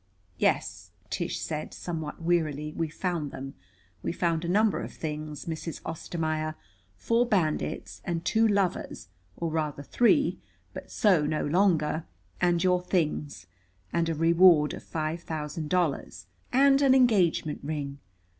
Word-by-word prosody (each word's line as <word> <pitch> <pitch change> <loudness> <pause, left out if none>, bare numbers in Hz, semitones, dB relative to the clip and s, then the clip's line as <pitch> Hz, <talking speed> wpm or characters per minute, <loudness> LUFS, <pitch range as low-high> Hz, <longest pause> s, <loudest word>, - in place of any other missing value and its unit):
"Yes," 95 -1 0 0.2
Tish - - -2
said 150 -1 -4
somewhat 160 -4 -5
wearily, 155 -3 0
"we 165 -1 -1
found 170 -2 -2
them. 135 0 -7 0.5
We - - -2
found 170 -1 0
a 170 - -2
number 205 -3 +3
of - - -6
things, 150 0 -5
Mrs. 165 -1 -5
Ostermaier, 155 -1 -3 0.4
four 230 - +2
bandits, 170 -9 -1
and 170 -2 -3
two 225 +4 +3
lovers, 195 - -1 0.3
or 170 -1 -2
rather 150 -3 -2
three, 285 - +3 0.3
but - - -8
so 180 -8 +3
no 155 0 -1
longer, 160 -2 +2 0.4
and 175 -1 +3
your 180 -1 +3
things, 155 - -1 0.5
and 165 -1 +1
a 165 - -1
reward 165 -1 +5
of - - -7
five 160 +1 -3
thousand 155 -1 -5
dollars, 145 - -1 0.3
and 275 +1 +5
an 265 -2 +5
engagement 190 - +3
ring. 140 -1 -4
165 Hz, 135 wpm, -28 LUFS, 150-180 Hz, 0.5 s, reward